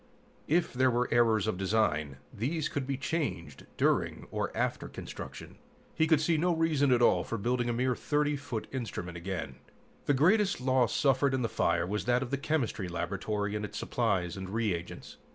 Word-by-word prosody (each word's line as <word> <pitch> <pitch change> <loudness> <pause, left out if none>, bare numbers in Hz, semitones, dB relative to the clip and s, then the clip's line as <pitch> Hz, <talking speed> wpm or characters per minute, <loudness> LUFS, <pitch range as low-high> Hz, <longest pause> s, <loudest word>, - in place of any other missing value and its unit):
If 170 +2 +1
there 130 +1 +3
were 125 0 +1
errors 115 -3 +3
of 110 -4 -2
design, 85 -9 +1 0.2
these 150 +8 -1
could 135 -2 -3
be 135 -1 -1
changed 155 +3 -3
during - - +1
or - - -2
after - - -1
construction. - - -9 0.3
He 160 - +2
could 160 -2 +4
see 160 +1 +2
no 175 +2 +2
reason 155 -4 +2
at 120 -1 +4
all - - +4
for 115 - -4
building 120 +3 0
a - - +1
mere 125 +1 +1
30 150 +2 0
foot 135 -6 -4
instrument 105 -9 -5
again. 85 -7 -5 0.5
The 145 - +4
greatest 190 +8 +3
loss 130 -2 +2
suffered 135 -1 +3
in 130 - -1
the - - +2
fire - - +1
was 105 +3 -2
that 125 +2 +2
of 120 - -7
the 140 - +1
chemistry 135 -10 -1
laboratory 100 +4 -2
and 105 - -2
its 105 - -5
supplies 90 -3 0
and 95 -1 -6
reagents. 100 -6 -3
120 Hz, 185 wpm, -30 LUFS, 100-145 Hz, 0.5 s, could